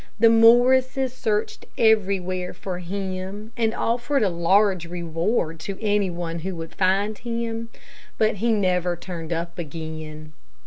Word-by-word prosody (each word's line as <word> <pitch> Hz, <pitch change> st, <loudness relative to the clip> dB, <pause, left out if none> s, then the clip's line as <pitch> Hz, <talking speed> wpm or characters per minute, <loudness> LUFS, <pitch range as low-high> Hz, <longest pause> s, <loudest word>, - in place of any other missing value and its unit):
The 230 Hz, +1 st, +6 dB
Morrises 250 Hz, +3 st, +5 dB
searched 215 Hz, -4 st, -2 dB
everywhere 185 Hz, -5 st, +1 dB
for 180 Hz, 0 st, -5 dB
him, 190 Hz, +3 st, -5 dB
and 225 Hz, -2 st, +1 dB
offered 240 Hz, +3 st, 0 dB
a 200 Hz, -, +3 dB
large 185 Hz, +1 st, +2 dB
reward 170 Hz, 0 st, -2 dB
to 195 Hz, +4 st, -5 dB
any 205 Hz, -3 st, +1 dB
one 170 Hz, -1 st, -4 dB
who 185 Hz, +2 st, -4 dB
would 165 Hz, -1 st, -7 dB
find 200 Hz, +3 st, +1 dB
him, 230 Hz, -1 st, -3 dB, 0.5 s
but 215 Hz, -1 st, +2 dB
he 230 Hz, +4 st, +1 dB
never 180 Hz, -4 st, +1 dB
turned 170 Hz, -2 st, -7 dB
up 170 Hz, +1 st, -3 dB
again. 155 Hz, -1 st, -7 dB
190 Hz, 135 wpm, -24 LUFS, 170-225 Hz, 0.5 s, The